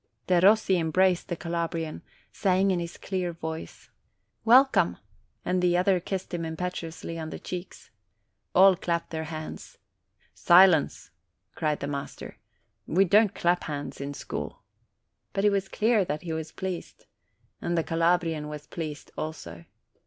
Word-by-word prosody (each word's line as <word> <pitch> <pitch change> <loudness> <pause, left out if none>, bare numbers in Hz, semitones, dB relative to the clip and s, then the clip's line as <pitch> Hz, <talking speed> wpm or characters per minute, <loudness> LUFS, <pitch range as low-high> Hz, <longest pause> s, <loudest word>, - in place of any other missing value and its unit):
Derossi 190 +1 +4
embraced 180 +2 +2
the 175 - -2
Calabrian, 165 -1 -3 0.3
saying 190 0 +2
in 180 - +1
Kis 170 0 -6
clear 180 -3 -3
MY - - -20
SCHOOLMATES - - -37
9 160 - -1
voice, - - -13 0.5
"Welcome!" 260 +4 +5 0.5
and 180 0 +1
the 175 -1 +3
other 185 0 +3
kissed 190 +1 -5
him 175 - -2
impetu 165 +1 -4
ously 165 0 -7
on 160 -1 -5
the - - -6
cheeks. 180 0 -8 0.6
All 190 +1 +7
clapped 170 -1 -2
their 160 -1 -3
hands. 155 0 -8 0.6
''Si 180 +3 +7
lence!" 160 -5 0 0.4
cried 150 -2 -1
the 140 - -2
master; 140 -1 -6 0.5
"we 190 +4 +3
don't 205 +2 +4
clap 175 +1 +1
hands 145 -2 -5
in 140 +1 -5
school!" - - -6 0.7
But 195 - 0
it 205 - +5
was 195 -1 -1
clear 220 -1 +2
that 150 -2 -4
he 165 -2 -4
was 160 0 -5
pleased. 185 -2 -6 0.6
And 170 0 -1
the 165 - +2
Calabrian 165 -2 +1
was 150 0 -7
pleased 155 -3 -7
also. 85 - -6
170 Hz, 155 wpm, -27 LUFS, 160-185 Hz, 0.7 s, All